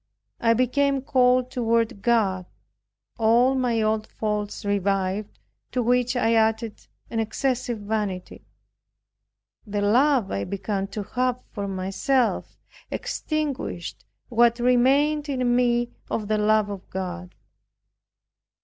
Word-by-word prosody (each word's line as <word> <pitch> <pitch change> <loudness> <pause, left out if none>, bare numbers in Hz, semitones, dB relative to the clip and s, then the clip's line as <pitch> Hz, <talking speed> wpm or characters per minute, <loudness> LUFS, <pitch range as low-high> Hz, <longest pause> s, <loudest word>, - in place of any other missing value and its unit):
I 230 -1 +3
became 270 +2 +1
cold 255 -1 +3
toward 230 -4 0
God. 195 -6 +1 0.7
All 235 +4 +4
my 245 -4 +1
old 215 0 0
faults 210 -1 -3
revived 200 0 -1 0.4
to 250 - +1
which 250 +1 +2
I 230 -2 +2
added 225 0 0 0.2
an 225 - -1
excessive 240 +2 -1
vanity. 205 -3 -4 1.2
The 205 0 -2
love 245 +1 +3
I 100 - -1
began 195 0 -3
to 210 +1 -5
have 250 +3 -1
for 200 -2 -4
myself 195 +7 -1 0.3
extinguished 295 - -3 0.2
what 235 -1 +3
remained 275 +5 +3
in 250 -3 +1
me 240 -1 +2 0.2
of 215 -2 -2
the 215 0 +1
love 210 0 +2
of 195 -2 -8
God. 180 -1 -5
230 Hz, 115 wpm, -24 LUFS, 205-250 Hz, 1.2 s, All